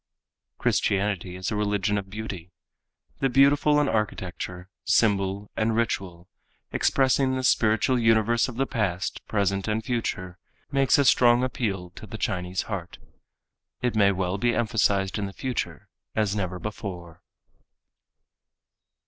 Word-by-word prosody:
Christianity 100 Hz, -3 st, 0 dB
is 95 Hz, 0 st, -4 dB
a -, -, -1 dB
religion 105 Hz, 0 st, 0 dB
of 100 Hz, -1 st, -3 dB
beauty. 95 Hz, -4 st, -6 dB, 0.7 s
The 135 Hz, -, +2 dB
beautiful 145 Hz, +3 st, +4 dB
in 145 Hz, -, +2 dB
architecture, 90 Hz, -4 st, -3 dB, 0.2 s
symbol 100 Hz, -2 st, +1 dB
and 110 Hz, 0 st, +1 dB
ritual, 95 Hz, -6 st, -2 dB, 0.4 s
expressing 130 Hz, 0 st, +2 dB
the 130 Hz, -, -2 dB
spiritual 115 Hz, +1 st, +3 dB
universe 115 Hz, +1 st, +3 dB
of 125 Hz, -, -7 dB
the 135 Hz, +3 st, +1 dB
past, 95 Hz, -8 st, -2 dB
present 100 Hz, -1 st, 0 dB
and 110 Hz, +1 st, -1 dB
future, 95 Hz, -7 st, -3 dB, 0.3 s
makes 135 Hz, -1 st, +3 dB
a 140 Hz, -, +3 dB
strong 120 Hz, -1 st, +5 dB
appeal 100 Hz, -9 st, -2 dB
to 110 Hz, -, -11 dB
the 110 Hz, -, -7 dB
Chinese 90 Hz, -3 st, -2 dB
heart. 95 Hz, -5 st, -6 dB, 0.9 s
It 125 Hz, -2 st, 0 dB
may 100 Hz, -2 st, +5 dB
well 95 Hz, 0 st, -2 dB
be 120 Hz, +2 st, +1 dB
emphasized 100 Hz, -3 st, +1 dB
in 100 Hz, -, -2 dB
the 95 Hz, -, -9 dB
future 130 Hz, +2 st, -4 dB, 0.3 s
as 105 Hz, -2 st, +1 dB
never 95 Hz, -3 st, -2 dB
before. 90 Hz, -5 st, -7 dB
105 Hz, 130 wpm, -26 LUFS, 95-120 Hz, 0.9 s, strong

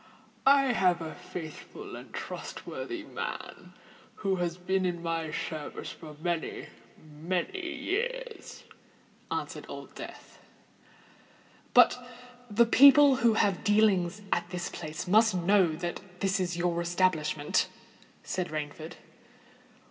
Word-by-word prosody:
"I 275 Hz, -1 st, +6 dB
have 180 Hz, -5 st, +3 dB
a 160 Hz, -1 st, -5 dB
faithful 160 Hz, -3 st, -8 dB
and -, -, -11 dB
trustworthy 350 Hz, -3 st, -6 dB
man -, -, -6 dB, 0.4 s
who 195 Hz, -2 st, -1 dB
has 175 Hz, -1 st, -2 dB
been 190 Hz, +1 st, 0 dB
in 175 Hz, -2 st, -2 dB
my 165 Hz, -1 st, -2 dB
service 155 Hz, -1 st, -5 dB
for 155 Hz, -2 st, -11 dB
many—many 175 Hz, -, -4 dB
years," 485 Hz, +6 st, -4 dB, 0.7 s
answered -, -, -4 dB
Old -, -, -8 dB
Death. -, -, -10 dB, 1.4 s
"But 250 Hz, -, +6 dB, 0.5 s
the 215 Hz, +3 st, +5 dB
people 280 Hz, +3 st, +8 dB
who 230 Hz, -2 st, +3 dB
have 200 Hz, -4 st, +2 dB
dealings 205 Hz, -3 st, +3 dB
at 175 Hz, -, 0 dB
this 180 Hz, -1 st, -4 dB
place 155 Hz, +2 st, -6 dB
must 215 Hz, +2 st, +5 dB
know 185 Hz, +1 st, +4 dB
that 175 Hz, +2 st, -4 dB, 0.2 s
it 195 Hz, +1 st, +1 dB
is 175 Hz, -2 st, -1 dB
your 175 Hz, -1 st, 0 dB
establishment?" 170 Hz, -4 st, +1 dB, 0.5 s
said 180 Hz, -1 st, -2 dB
Rainford. 155 Hz, +1 st, -5 dB
180 Hz, 110 wpm, -29 LUFS, 170-220 Hz, 1.4 s, people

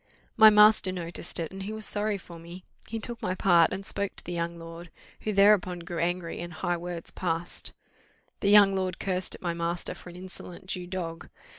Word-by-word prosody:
My 220 Hz, 0 st, +9 dB
master 210 Hz, -2 st, +6 dB
noticed 175 Hz, -1 st, -4 dB
it, 165 Hz, -2 st, -3 dB
and 195 Hz, 0 st, -8 dB
he 200 Hz, +2 st, -5 dB
was 220 Hz, -1 st, -4 dB
sorry 210 Hz, 0 st, 0 dB
for 170 Hz, -3 st, -12 dB
me; 170 Hz, +2 st, -11 dB, 0.2 s
he 225 Hz, -, -4 dB
took 235 Hz, +2 st, -5 dB
my 185 Hz, -4 st, -1 dB
part, 175 Hz, -3 st, +4 dB
and 195 Hz, -, -5 dB
spoke 200 Hz, 0 st, -3 dB
to -, -, -7 dB
the 175 Hz, -, -6 dB
young 170 Hz, 0 st, -3 dB
lord, 165 Hz, +1 st, -9 dB, 0.3 s
who 215 Hz, -, -2 dB
thereupon 200 Hz, -3 st, +4 dB
grew 170 Hz, 0 st, -6 dB
angry, 175 Hz, 0 st, -2 dB
and 175 Hz, 0 st, -6 dB
high 175 Hz, +2 st, -1 dB
words 170 Hz, -1 st, -6 dB
passed; 170 Hz, -1 st, -3 dB, 0.7 s
the 200 Hz, -, +1 dB
young 205 Hz, -1 st, +7 dB
lord 185 Hz, -2 st, -1 dB
cursed 185 Hz, -1 st, -1 dB
at -, -, -14 dB
my 170 Hz, -1 st, 0 dB
master 170 Hz, +1 st, -2 dB
for -, -, -12 dB
an 175 Hz, -, -11 dB
insolent 180 Hz, -1 st, -10 dB
Jew 180 Hz, -1 st, -4 dB
dog. 170 Hz, -3 st, -5 dB
180 Hz, 205 wpm, -28 LUFS, 170-195 Hz, 0.7 s, My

